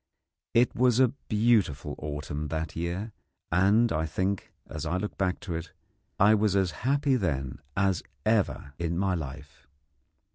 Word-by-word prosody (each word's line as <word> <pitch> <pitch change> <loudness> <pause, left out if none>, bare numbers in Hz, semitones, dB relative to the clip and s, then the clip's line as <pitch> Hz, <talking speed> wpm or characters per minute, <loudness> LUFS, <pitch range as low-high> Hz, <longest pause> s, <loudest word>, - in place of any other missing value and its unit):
It 120 +1 +4
was 125 -1 +3
a 130 -2 +6 0.2
beautiful 105 - +2
autumn 75 0 -4
that 80 0 -3
year, 85 +6 -3 0.4
and 100 +7 +4
I 80 +1 0
think, 95 +4 -2 0.2
as 80 - -6
I 85 +3 -1
look 105 +2 -4
back 95 -1 0
to 95 -4 -4
it, 80 -1 -5 0.5
I 105 +2 +7
was 105 -2 +2
as 95 -3 +2
happy 140 +2 +1
then 70 - -2 0.2
as 95 -3 +2 0.2
ever 105 -9 +1
in 85 0 -1
my 95 0 +1
life. 70 -5 -7
95 Hz, 150 wpm, -28 LUFS, 80-110 Hz, 0.5 s, I